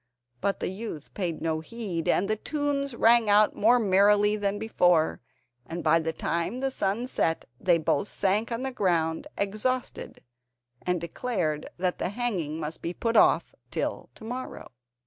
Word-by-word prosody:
But 200 - 0
the - - -1
youth 190 -6 -7
paid 170 -5 -3
no 160 -1 0
heed, 180 -2 -4
and 195 - +2
the 215 - +1
tunes 280 +1 -2
rang 230 -1 +5
out 210 +1 +5
more 235 +4 +5
merrily 205 0 +4
than 205 -1 -1
before, 180 -7 +2 0.4
and 165 +5 -6
by 160 +1 +4
the 160 0 -2
time 170 +9 -2
the 270 0 -1
sun 210 0 -1
set 165 -10 -1
they 175 -2 +3
both 155 +2 0
sank 205 +5 0
on 230 +2 -2
the 265 - -2
ground 170 -8 0
exhausted, 215 +6 -2 0.6
and 180 -1 0
declared 170 -3 -2
that 180 0 -1
the - - -1
hanging 190 -9 -2
must 155 +1 -5
be 170 +1 -4
put 230 0 -1
off - - +4 0.2
till - - -3
to - - -14
morrow. 250 +3 -6
200 Hz, 165 wpm, -27 LUFS, 170-230 Hz, 0.6 s, rang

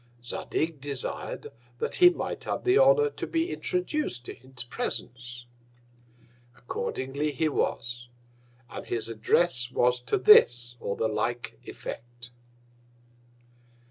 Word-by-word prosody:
Zadig 155 +5 -3
desired 140 -2 -4 0.3
that - - -2
he 355 -1 +8
might 355 - -4
have - - -2
the 375 +3 +4
Honour - - +5
to - - -5
be 330 +1 -1
introduc'd 305 - -2
into - - -5 0.2
his 130 - -2
Presence. 120 0 -3 1.1
Accordingly 135 +4 -3
he 160 +3 0
was, 120 -4 -2 0.6
and - - -7
his 115 -1 -2
Address 125 +4 +2
was 125 0 +2
to 125 - -1
this 120 - +6
or 100 - -3
the 110 - 0
like 115 - -2
Effect. 120 +1 -8
125 Hz, 115 wpm, -28 LUFS, 120-175 Hz, 1.1 s, he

